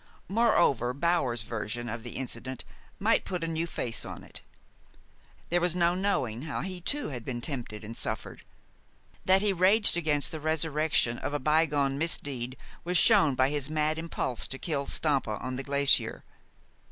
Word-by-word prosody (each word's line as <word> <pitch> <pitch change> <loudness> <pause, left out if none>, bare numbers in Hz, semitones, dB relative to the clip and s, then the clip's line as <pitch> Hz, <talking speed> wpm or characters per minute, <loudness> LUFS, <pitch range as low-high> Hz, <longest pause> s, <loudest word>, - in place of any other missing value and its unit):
Moreover, 170 - +2
Bower's 140 -7 +1
version 115 +1 -4
of 115 +1 -4
the 120 +1 -8
incident 130 0 -5 0.3
might - - +2
put 180 -3 -4
a - - -1
new 165 +1 -1
face 120 -7 -2
on - - -8
it. - - -6 1.1
There 175 +1 +2
was 175 -1 +1
no 175 -1 +3
knowing 155 - -1
how 150 -1 -4
he 185 -1 -5
too 290 +11 -2
had 125 -5 -6
been 120 0 -4
tempted 120 -5 -5
and 110 +2 -7
suffered. - - -3 0.8
That 190 +2 +4
he 205 -2 +2
raged 190 +4 +4
against 150 -4 +1
the 160 - -5
resurrection 155 -5 +1
of 145 - -3
a - - 0
bygone 145 -2 +2
misdeed 135 -6 -1 0.3
was 180 +1 +1
shown 190 - +5
by 130 +1 +3
his 145 -1 -2
mad 155 0 0
impulse 160 -7 -2
to 135 - -2
kill 140 -2 -3
Stampa 135 -8 0
on 130 +3 -5
the 130 - -3
glacier. 140 0 +3
145 Hz, 165 wpm, -29 LUFS, 130-170 Hz, 1.1 s, shown